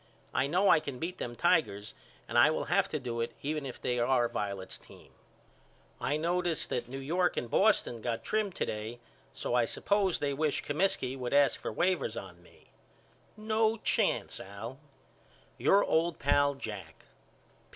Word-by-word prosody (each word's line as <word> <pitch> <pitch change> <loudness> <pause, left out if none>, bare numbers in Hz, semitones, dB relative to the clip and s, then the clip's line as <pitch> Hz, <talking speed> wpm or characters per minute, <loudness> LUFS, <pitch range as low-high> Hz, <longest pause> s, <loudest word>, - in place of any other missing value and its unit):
I 130 +2 +2
know 180 +7 +2
I 165 - +7
can 140 -4 -6
beat 170 +6 -4
them 120 0 -4
Tigers 115 - +1 0.3
and - - -6
I 120 +5 +7
will 155 - -1
have 195 +3 +2
to 155 - -1
do 120 -3 -3
it 115 - -3
even 150 -1 -2
if 125 - -8
they 125 0 -1
are 120 0 +3
Violet's 100 -4 -4
team. - - -17 0.9
I 145 - 0
notice 175 +1 0
that 120 -1 -3
New 135 - -5
York 170 +7 0
and 120 - -3
Boston 195 - +3
got 115 0 -2
trimmed 210 -3 -1
to - - -1
day 110 +3 -5 0.3
so 130 - -4
I 120 -1 +4
suppose 200 - +1
they 145 -1 -1
wish 150 +1 0
Comiskey 150 -4 0
would 125 0 -2
ask 145 -1 +4
for - - -3
waivers 175 -11 0
on 90 -2 -12
me. 90 - -22 0.7
No 220 +1 +1
chance - - 0
Al. 110 +7 -8 0.8
Your 200 - +5
old 165 +1 +1
pal, 145 0 +3
JACK. 105 -7 -8
140 Hz, 170 wpm, -31 LUFS, 120-175 Hz, 0.9 s, I